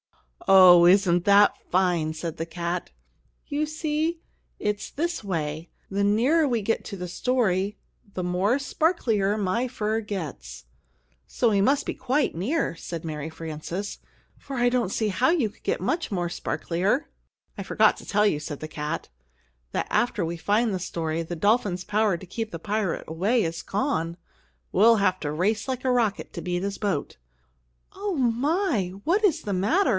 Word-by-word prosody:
"Oh, 180 -2 +8
isn't 180 -2 +4
that 205 0 +6
fine!" 175 -4 +1
said 160 0 -5
the 165 - -4
cat. 170 +1 -3 0.6
"You 300 0 -1
see, 310 +2 -1 0.4
it's 210 0 -2
this 340 -2 -2
way 160 -4 -3 0.2
the 200 +1 0
nearer 255 +11 +3
we 235 -5 0
get 225 +3 0
to 200 - -6
the 180 0 -5
story, 205 -2 0 0.4
the 185 - -2
more 185 +7 +1
sparklier 235 - +1
my 215 +5 0
fur 220 -2 -1
gets." 140 - -6 0.6
"So 235 -3 +1
we 200 -1 +3
must 270 +7 +2
be - - -2
quite 265 - 0
near," 205 - -1
said 165 0 -7
Mary 155 -1 -4
Frances; 165 +5 -6 0.4
"for 275 - -8
I 245 0 +3
don't 245 -5 +1
see 215 +2 0
how 245 +6 +2
you 310 -10 +2
could - - -27
get - - 0
much 330 -6 -1
more 175 -3 -1
sparklier." 185 - -1 0.5
"I - - -4
forgot - - +3
to - - -11
tell 210 0 +2
you," 180 -8 +2
said 145 -1 -6
the 155 - -5
cat, 150 +1 -4 0.6
"that - - -2
after 210 -4 +1
we 170 +1 -3
find 210 +6 +1
the 185 - -1
story, 165 -2 -3
the 165 +1 -5
dolphin's 205 -1 +1
power 210 -3 +1
to 190 - -11
keep 225 +5 -4
the 165 - -6
pirate 205 0 -2
away 200 +9 +1
is 165 0 -3
gone. 185 - -1 0.6
We'll 225 +4 +6
have 185 -2 +2
to 145 - -2
race 205 - 0
like 260 -1 -3
a 255 - +3
rocket 230 -5 0
to - - -5
beat 180 0 -2
his 200 0 -3
boat." 195 - -2 0.8
"Oh, 395 -1 -3
my, 255 - +1
what 390 +7 +2
is 325 -6 +2
the 205 - -2
matter!" 290 - +2
200 Hz, 170 wpm, -25 LUFS, 175-245 Hz, 0.8 s, Oh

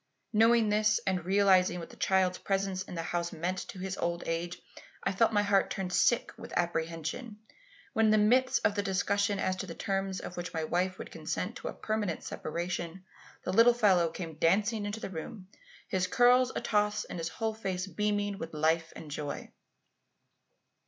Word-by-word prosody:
Knowing 225 0 +5
this, 215 +1 +3
and 185 -3 0
realizing 190 -2 +4
what 165 - -8
the - - -13
child's 185 -1 +2
presence 195 -1 -1
in 185 - -7
the 165 - -3
house 170 +1 -2
meant 180 +3 -2
to - - -9
his 190 0 -4
old 170 0 -1
age, 170 +1 -3 0.4
I - - +1
felt 225 +4 +3
my 205 -1 +3
heart 200 -1 +3
turn 190 -2 -3
sick 240 +5 +3
with - - -9
apprehension, 170 - -2 0.6
when 225 - +3
in 215 - +5
the 215 - +5
midst 255 +5 +3
of - - +4
the 205 - 0
discussion 200 +1 +1
as 185 -1 0
to 195 - -5
the 165 - -7
terms 195 -1 -2
on - - -6
which 175 -1 -6
my 160 - -1
wife 180 +3 0
would - - -8
consent - - -4
to - - -6
a - - -4
permanent 215 -6 -2
separation, 175 +2 -4 0.4
the 185 - -2
little 230 +3 +6
fellow 190 -7 +4
came 160 -3 -7
dancing 205 +5 +2
into 205 +2 -4
the 195 - -6
room, 185 +3 -7 0.4
his 185 -1 0
curls 245 +4 +5
atoss 210 0 0
and - - -6
his 165 0 -2
whole 220 +5 -2
face 190 -4 -3
beaming 205 0 -1
with 165 -1 -6
life 160 +2 +1
and 155 -2 -9
joy. 145 0 -5
190 Hz, 185 wpm, -30 LUFS, 175-210 Hz, 0.6 s, little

